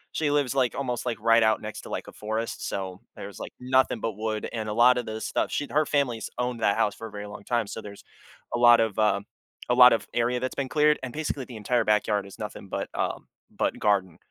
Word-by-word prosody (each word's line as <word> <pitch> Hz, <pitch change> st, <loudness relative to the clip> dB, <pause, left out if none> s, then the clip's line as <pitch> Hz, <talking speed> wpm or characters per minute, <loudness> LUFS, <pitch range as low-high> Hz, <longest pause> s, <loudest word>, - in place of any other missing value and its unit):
she 155 Hz, -2 st, +1 dB
lives, 145 Hz, -3 st, +1 dB
like, 130 Hz, -3 st, +1 dB
almost, 125 Hz, -3 st, -3 dB
like, 115 Hz, -3 st, -2 dB
right 115 Hz, +1 st, +4 dB
out 110 Hz, -1 st, +3 dB
next 110 Hz, 0 st, -7 dB
to, -, -, -11 dB
like, -, -, -4 dB
a -, -, -9 dB
forest, 110 Hz, +2 st, -4 dB
so 95 Hz, -1 st, -4 dB
there's, -, -, -9 dB
like, -, -, -6 dB
nothing 130 Hz, -2 st, +2 dB
but 115 Hz, -, -2 dB
wood 110 Hz, 0 st, -3 dB
and 110 Hz, -2 st, -3 dB
a 105 Hz, -, -2 dB
lotta 125 Hz, +2 st, +5 dB
the 110 Hz, -2 st, -6 dB
stuff, -, -, -1 dB
she 145 Hz, -, -2 dB
her 150 Hz, +1 st, +3 dB
family's 130 Hz, -6 st, 0 dB
owned 125 Hz, -1 st, -2 dB
that 100 Hz, -, +2 dB
house 105 Hz, -, +2 dB
for 115 Hz, -, -7 dB
a -, -, -13 dB
very 105 Hz, 0 st, -7 dB
long 105 Hz, 0 st, -10 dB
time, 120 Hz, +1 st, 0 dB
so 110 Hz, -, -6 dB
there's 100 Hz, -1 st, -11 dB, 0.5 s
a 120 Hz, -, +1 dB
lot 120 Hz, -1 st, +7 dB
of 110 Hz, -3 st, 0 dB
uh, 105 Hz, -2 st, +3 dB, 0.5 s
a 125 Hz, -, +4 dB
lot 125 Hz, 0 st, +9 dB
of 115 Hz, -, -1 dB
area 120 Hz, +1 st, +1 dB
that's 130 Hz, +1 st, -3 dB
been 135 Hz, -1 st, -2 dB
cleared, 150 Hz, +1 st, +3 dB
and 125 Hz, -2 st, -5 dB
basically 145 Hz, -4 st, -3 dB
the 125 Hz, -, -11 dB
entire 120 Hz, +4 st, +1 dB
backyard 105 Hz, -1 st, +1 dB
is 100 Hz, -, -13 dB
nothing 105 Hz, -2 st, -7 dB
but, -, -, -3 dB
uh, -, -, -1 dB, 0.3 s
but -, -, -2 dB
garden. 95 Hz, -5 st, +1 dB
115 Hz, 245 wpm, -26 LUFS, 105-125 Hz, 0.5 s, lot